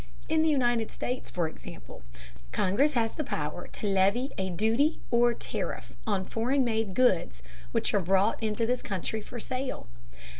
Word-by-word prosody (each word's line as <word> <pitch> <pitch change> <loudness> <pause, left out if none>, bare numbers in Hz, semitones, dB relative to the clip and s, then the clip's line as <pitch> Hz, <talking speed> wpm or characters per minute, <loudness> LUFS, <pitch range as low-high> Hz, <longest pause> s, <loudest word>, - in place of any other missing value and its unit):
In 320 0 +3
the 320 - +3
United 240 -6 +2
States, 250 +1 -4
for 175 -3 0
example, 60 - -10 0.5
Congress 270 +11 +2
has 225 -3 +1
the 305 - -2
power 155 - -3
to - - -7
levy 200 +7 +2
a 190 -1 -2
duty 225 - +2
or 240 0 +4
tariff - - -4
on 195 -3 +1
foreign 255 +7 +1
made 220 -4 0
goods 170 - +2 0.3
which - - 0
are 205 - +4
brought 195 +5 +2
into 220 +1 0
this 250 +2 0
country 200 +3 -3
for 240 +3 -8
sale. 255 +3 -3
225 Hz, 160 wpm, -29 LUFS, 190-250 Hz, 0.5 s, or